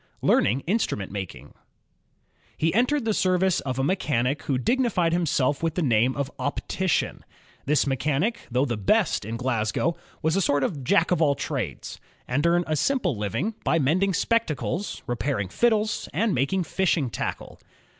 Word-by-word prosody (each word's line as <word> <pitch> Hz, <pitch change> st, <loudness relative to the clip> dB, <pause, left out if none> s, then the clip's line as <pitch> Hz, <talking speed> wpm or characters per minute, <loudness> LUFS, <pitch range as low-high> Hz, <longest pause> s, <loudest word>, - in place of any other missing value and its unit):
Learning 120 Hz, +7 st, +3 dB
Instrument 170 Hz, -, -1 dB
Making 95 Hz, -3 st, -7 dB, 1.0 s
He 160 Hz, +1 st, +1 dB
entered 250 Hz, +4 st, +2 dB
the 220 Hz, -, +1 dB
service 185 Hz, -1 st, +2 dB
of 130 Hz, -2 st, -4 dB
a 135 Hz, -, 0 dB
mechanic 145 Hz, -5 st, 0 dB
who 135 Hz, -, -1 dB
dignified 185 Hz, -, +1 dB
him 170 Hz, -1 st, +1 dB
self 140 Hz, 0 st, +1 dB
with 165 Hz, -1 st, -1 dB
the 180 Hz, -, 0 dB
name 125 Hz, -1 st, +2 dB
of 140 Hz, 0 st, -3 dB
" -, -, -41 dB
optician." 185 Hz, +4 st, -2 dB, 0.4 s
This 150 Hz, -1 st, +3 dB
mechanic, 150 Hz, -, 0 dB
though 125 Hz, +3 st, +1 dB
the 120 Hz, -5 st, -2 dB
best 175 Hz, -, +2 dB
in 115 Hz, +2 st, -4 dB
Glasgow, 125 Hz, +5 st, 0 dB, 0.3 s
was 160 Hz, +2 st, +2 dB
a 195 Hz, -, +2 dB
sort 145 Hz, -5 st, +2 dB
of 140 Hz, -3 st, -2 dB
Jack 165 Hz, +8 st, +2 dB
of 180 Hz, -, +2 dB
all 145 Hz, -3 st, +3 dB
trades, -, -, -4 dB, 0.3 s
and 145 Hz, +6 st, +1 dB
earned 175 Hz, +1 st, +2 dB
a 155 Hz, -, 0 dB
simple 255 Hz, -, +1 dB
living 115 Hz, -, -2 dB
by 165 Hz, -, +2 dB
mending 175 Hz, +6 st, +2 dB
spectacles, 200 Hz, -, -1 dB
repairing 120 Hz, -5 st, -2 dB
fiddles, 220 Hz, -, +1 dB
and 205 Hz, +6 st, +1 dB
making 160 Hz, +9 st, +1 dB
fishing 165 Hz, -8 st, 0 dB
tackle. -, -, -5 dB
155 Hz, 165 wpm, -25 LUFS, 130-190 Hz, 1.0 s, Learning